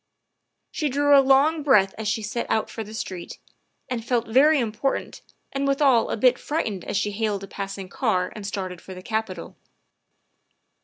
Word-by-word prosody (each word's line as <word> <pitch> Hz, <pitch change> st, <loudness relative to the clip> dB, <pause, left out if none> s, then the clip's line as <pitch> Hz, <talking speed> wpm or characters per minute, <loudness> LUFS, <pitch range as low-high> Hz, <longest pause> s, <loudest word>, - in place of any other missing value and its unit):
' -, -, -54 dB
' -, -, -54 dB
She 300 Hz, -2 st, -1 dB
drew 285 Hz, +2 st, +4 dB
a 275 Hz, -, +8 dB
long 275 Hz, +4 st, +4 dB
breath 210 Hz, -10 st, +4 dB
as 220 Hz, -1 st, -5 dB
she 215 Hz, +1 st, -1 dB
set 220 Hz, +3 st, -3 dB
out 220 Hz, -, 0 dB
for 225 Hz, -, -5 dB
the 215 Hz, +1 st, -10 dB
street, 185 Hz, -5 st, -6 dB, 0.5 s
and 240 Hz, -3 st, -3 dB
felt 235 Hz, 0 st, 0 dB
very 285 Hz, +7 st, +5 dB
important 235 Hz, +3 st, -2 dB, 0.3 s
and 275 Hz, 0 st, -1 dB
withal 275 Hz, -4 st, +3 dB
a -, -, -2 dB
bit 250 Hz, +2 st, +4 dB
frightened 215 Hz, -, -3 dB
as -, -, -2 dB
she 210 Hz, 0 st, 0 dB
hailed 205 Hz, -1 st, -2 dB
a -, -, -7 dB
passing 195 Hz, -1 st, -6 dB
car 185 Hz, -3 st, -1 dB
and 205 Hz, -2 st, -6 dB
started 185 Hz, -3 st, -5 dB
for 190 Hz, -, -10 dB
the 185 Hz, -, -10 dB
Capitol. 215 Hz, -5 st, -4 dB
220 Hz, 190 wpm, -24 LUFS, 200-270 Hz, 0.5 s, a